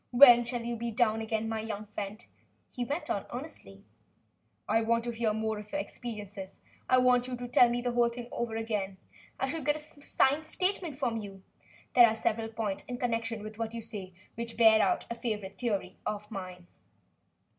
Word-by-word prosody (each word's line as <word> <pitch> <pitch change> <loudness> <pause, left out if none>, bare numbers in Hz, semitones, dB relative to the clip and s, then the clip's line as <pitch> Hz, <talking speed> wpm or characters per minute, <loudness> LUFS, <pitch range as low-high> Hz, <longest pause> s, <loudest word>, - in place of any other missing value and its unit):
"When 245 -2 +9
shall 240 0 -3
you 235 0 -3
be 235 +1 -2
down 225 -1 +2
again, 220 0 -1
my 225 0 -2
young 215 -1 -4
friend?" 210 +1 -6 0.5
he 245 - -3
went 285 +7 -3
on - - -2
earnestly. - - -7 0.8
"I 225 +2 +3
want 230 +1 +2
to 240 - -2
hear 225 -1 0
more 220 0 -1
of 210 0 -11
your 295 - -1
experiences. 205 -7 -7 0.3
I 255 - +6
want 250 -1 +4
you 250 -1 -4
to 245 0 -5
tell 245 0 +6
me 240 0 0
the 245 0 -1
whole 240 0 +3
thing 235 0 -7
over 235 -2 -2
again. 210 -4 -2 0.4
I 265 - +1
should 300 +1 -4
like 295 +1 +3
to - - -7
get 290 - -18
a - - -17
signed 285 +4 +2
statement 360 -4 -1
from 245 -5 0
you. 195 -3 -8 0.5
There 240 -2 +9
are 220 - 0
several 225 0 0
points 220 -3 -3
in 245 - -5
connection 230 -2 -1
with 215 +1 -8
what 225 0 -3
you 230 - -5
say, 190 -4 -8 0.2
which 230 0 -6
bear 220 -2 +7
out - - +2
a - - +1
favorite 210 -5 -4
theory 220 -6 -2
of 210 +1 -4
mine." 185 -3 -7
230 Hz, 205 wpm, -30 LUFS, 215-245 Hz, 0.8 s, When